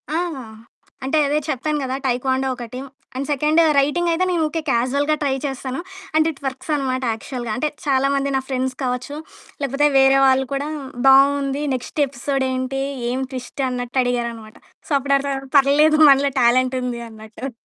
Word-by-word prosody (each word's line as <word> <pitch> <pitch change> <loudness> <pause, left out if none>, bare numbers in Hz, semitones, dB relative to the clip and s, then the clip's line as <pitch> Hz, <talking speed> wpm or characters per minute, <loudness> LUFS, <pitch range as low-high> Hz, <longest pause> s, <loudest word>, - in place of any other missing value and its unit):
ఆ! 310 - -1 0.9
అంటే 270 +4 +1
అదే 295 +2 +1
చెప్తాను 300 +3 -1
గదా! 260 0 -2
టైక్వాండో 260 +1 0
ఒకటి. 245 0 -7 0.4
అండ్ 270 +1 -3
సెకండ్ 300 +3 +3 0.2
రైటింగ్ 295 +5 +2
అయితే 345 +3 +1
నేను 340 -3 +1
ఉకె 325 +2 -3
క్యాజువల్‌గా 275 +5 +1
ట్రై 275 -2 +1
చేస్తాను. 265 -1 -4 0.4
అండ్ 315 0 +4
ఇట్ 285 - -16
వర్క్స్ 270 +4 -4
అనమాట 260 -2 -2
యాక్చువల్‌గా. 240 +1 -6
అంటే 300 +5 0 0.2
చాలామంది 275 0 +1
నా 265 - +1
ఫ్రెండ్స్ 260 0 -1
కావచ్చు 250 +3 -3 0.5
లేకపోతే 280 +2 +2
వేరే 270 0 +5
వాళ్ళ 265 0 +4
కూడా 280 +1 -2 0.4
బావుంది. 275 +1 +4
నెక్స్ట్ 255 +4 -6
ఎపిసోడ్ 270 +1 -2
ఏంటి? 260 +1 -2 0.3
ఏం 255 +2 -2
ట్విస్ట్ 260 +1 -5
అన్నట్టు 250 +1 -3
అడిగారనమాట. 235 -3 -3 0.3
సో, - - -12
అప్పుడు 275 +1 +1
అర్దమైంది. 270 -1 -4
పర్లేదు 300 +3 +4
మనలో 275 0 +4
టాలెంటుంది 250 0 +1
అన్నట్టు. 220 +4 -8
270 Hz, 155 wpm, -21 LUFS, 255-280 Hz, 0.9 s, వేరే